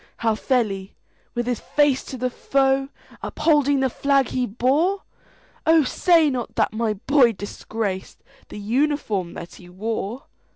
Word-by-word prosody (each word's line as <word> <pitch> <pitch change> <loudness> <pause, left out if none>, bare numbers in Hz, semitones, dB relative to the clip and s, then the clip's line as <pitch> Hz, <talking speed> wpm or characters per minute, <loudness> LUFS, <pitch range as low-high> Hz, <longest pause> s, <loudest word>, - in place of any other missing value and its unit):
"How 225 -1 +1
fell 245 +2 +1
he,—with 195 +4 -8
his 245 -2 -1
face 290 -3 +2
to 260 - -7
the 250 +1 -1
foe, 270 +1 +1 0.3
Upholding 290 -3 +2
the 265 - +2
flag 275 0 +2
he 250 -1 -1
bore? 285 - +1 0.6
Oh, 320 -1 +6
say 330 +4 +3
not 245 -3 -4
that - - +1
my 220 -1 0
boy 245 +3 +3
disgracedThe 210 +4 -6
uniform 220 - -1
that 170 - -8
he 180 - -14
wore!" 220 - -4
255 Hz, 135 wpm, -23 LUFS, 215-280 Hz, 0.6 s, Oh